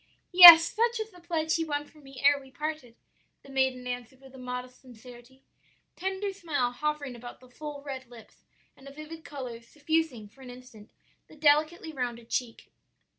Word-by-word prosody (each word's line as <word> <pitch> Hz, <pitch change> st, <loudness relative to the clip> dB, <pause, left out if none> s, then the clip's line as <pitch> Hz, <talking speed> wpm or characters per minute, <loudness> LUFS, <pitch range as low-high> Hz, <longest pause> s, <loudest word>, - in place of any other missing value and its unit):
"'Yes; 345 Hz, -2 st, +11 dB
such 470 Hz, +2 st, 0 dB
was 440 Hz, 0 st, -6 dB
the 360 Hz, -, -17 dB
pledge 325 Hz, -2 st, -2 dB
he 330 Hz, -, -1 dB
won 295 Hz, -2 st, -4 dB
from 305 Hz, 0 st, -21 dB
me 270 Hz, -2 st, -13 dB
ere 285 Hz, 0 st, +4 dB
we 270 Hz, -, -16 dB
parted,' 300 Hz, -4 st, -6 dB, 0.5 s
the 275 Hz, -, -15 dB
maiden 260 Hz, -2 st, -1 dB
answered 245 Hz, +1 st, -7 dB
with 265 Hz, 0 st, -17 dB
modest 250 Hz, 0 st, -8 dB
sincerity, 245 Hz, +1 st, -16 dB, 0.5 s
a -, -, -26 dB
tender 385 Hz, +2 st, -3 dB
smile 295 Hz, -10 st, -2 dB
hovering 290 Hz, 0 st, -4 dB
about 240 Hz, +1 st, -11 dB
the 255 Hz, -, -18 dB
full 290 Hz, +2 st, -9 dB
red 265 Hz, -3 st, -8 dB
lips 235 Hz, -2 st, -17 dB, 0.3 s
and 270 Hz, -, -17 dB
a -, -, -10 dB
vivid 305 Hz, +3 st, -11 dB
color 255 Hz, -6 st, -8 dB
suffusing 295 Hz, -3 st, -3 dB
for 265 Hz, +6 st, -21 dB
an 255 Hz, -, -11 dB
instant 245 Hz, -4 st, -14 dB, 0.4 s
the -, -, -17 dB
delicately 310 Hz, +2 st, +1 dB
rounded 240 Hz, -3 st, -6 dB
cheek. 240 Hz, -3 st, -4 dB
275 Hz, 175 wpm, -27 LUFS, 250-315 Hz, 0.5 s, Yes